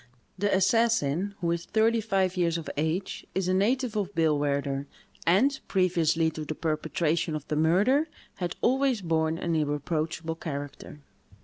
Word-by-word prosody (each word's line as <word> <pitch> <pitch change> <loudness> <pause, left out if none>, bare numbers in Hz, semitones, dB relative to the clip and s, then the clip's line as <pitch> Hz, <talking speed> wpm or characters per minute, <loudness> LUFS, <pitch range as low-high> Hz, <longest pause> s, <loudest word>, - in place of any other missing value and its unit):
The 205 +1 0
assassin, 200 -3 +2
who 170 -1 +1
is 170 0 -2
thirty 225 +1 +2
five 195 -3 0
years 170 -2 +1
of 165 - -7
age, 160 +6 -2
is 190 -1 0
a 185 - +2
native 230 +5 +1
of 205 -2 -2
Billwaerder, 145 -3 0 0.4
and, 265 +11 +4
previously 170 -4 +2
to 155 - -6
the 155 +1 -5
perpetration 160 +1 -1
of 150 -1 -6
the 150 - 0
murder, 200 - +3 0.3
had 175 -1 -3
always 260 -2 +2
borne 160 -2 0
an 170 -1 -2
irreproachable 155 +2 -2
character." 145 -1 -7
170 Hz, 145 wpm, -27 LUFS, 155-200 Hz, 0.4 s, and